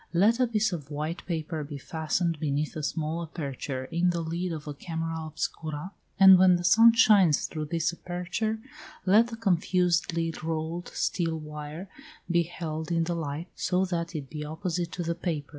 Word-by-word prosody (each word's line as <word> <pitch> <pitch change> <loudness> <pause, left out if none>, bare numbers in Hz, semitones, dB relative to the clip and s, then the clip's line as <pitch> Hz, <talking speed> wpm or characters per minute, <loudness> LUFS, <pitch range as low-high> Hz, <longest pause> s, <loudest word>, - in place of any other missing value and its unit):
Let 210 +8 +4
a 250 - +4
piece 220 -2 +1
of 150 -5 -6
white 155 +3 -4
paper 160 -2 -3
be 145 0 -7
fastened 160 +3 -1
beneath 150 0 -1
a 155 - -3
small 160 +2 -2
aperture 140 -5 -5
in 170 +5 +1
the 170 -1 -1
lid 170 +2 -3
of 155 -2 -6
a 150 - -4
camera 165 +1 -4
obscura, 155 +2 -4 0.3
and 190 -1 +9
when 185 -1 +6
the 175 - -2
sun 225 +6 +7
shines 195 -9 +5
through 155 -2 -4
this 165 +2 0
aperture, 180 +6 -3 0.5
let 210 +5 +5
the 235 - -6
confusedly 170 -4 +1
rolled 160 +2 -3
steel 165 -3 -1
wire 150 +3 -7 0.4
be 170 0 +4
held 160 -1 -5
in 165 -1 +2
the 175 +1 -1
light, 160 +1 -4
so 185 +1 +1
that 170 -2 -3
it 145 -3 -4
be 150 +2 -6
opposite 165 +2 -3
to 175 - -3
the 170 0 -1
paper. 165 -4 -3
165 Hz, 175 wpm, -28 LUFS, 155-180 Hz, 0.5 s, and